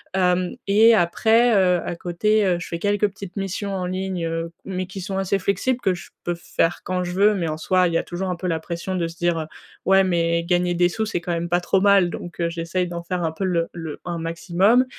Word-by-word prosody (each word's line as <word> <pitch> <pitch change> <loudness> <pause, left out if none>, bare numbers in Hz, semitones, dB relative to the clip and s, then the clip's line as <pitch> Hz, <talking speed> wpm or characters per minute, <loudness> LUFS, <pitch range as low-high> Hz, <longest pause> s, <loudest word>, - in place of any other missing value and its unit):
Hem 180 +1 +1
et 220 +3 +6
après, 225 +6 +3
heu, 180 -3 +3
à 175 - -3
côté, 205 +5 +1
heu, 180 -2 +2
je - - -7
fais 170 - -4
quelques 205 +1 +2
petites 195 -2 -10
missions 195 +1 -3
en 185 -1 -2
ligne, 185 -1 -3
heu 165 0 -3
mais 185 -1 -3
qui 190 0 -7
sont 190 +1 -4
assez 195 +1 +1
flexibles, 200 +7 0
que 190 -6 +1
je 175 - -9
peux 175 0 -1
faire 170 0 -1
quand 180 0 -1
je 175 - -4
veux 200 +4 +4
mais 170 -3 -1
en 155 0 -3
soi, 185 +2 +2
il 170 - -3
y - - +3
a - - -1
toujours 185 +2 -4
un 180 - -1
peu 180 +2 -4
la 165 -2 0
pression 170 +3 -4
de 170 -2 0
se 165 0 -11
dire: 170 -2 0 0.4
«Ouais 195 0 +5
mais 170 -2 +1
gagner 175 0 +1
des 175 0 +3
sous, 220 +4 -2
c'est 215 -5 -2
quand 175 0 -3
même 170 0 -2
pas 175 0 +3
trop 185 +2 +1
mal» 200 -3 +5
donc 175 0 -8
heu, 170 -1 +1
j'essaie 170 +2 -2
d'en 170 -1 -6
faire 175 0 -3
un 160 - 0
peu 175 +5 -5
le 170 -3 +1
le 165 -3 -6
un 175 -1 -3
maximum 180 +9 +2
180 Hz, 250 wpm, -22 LUFS, 170-195 Hz, 0.4 s, et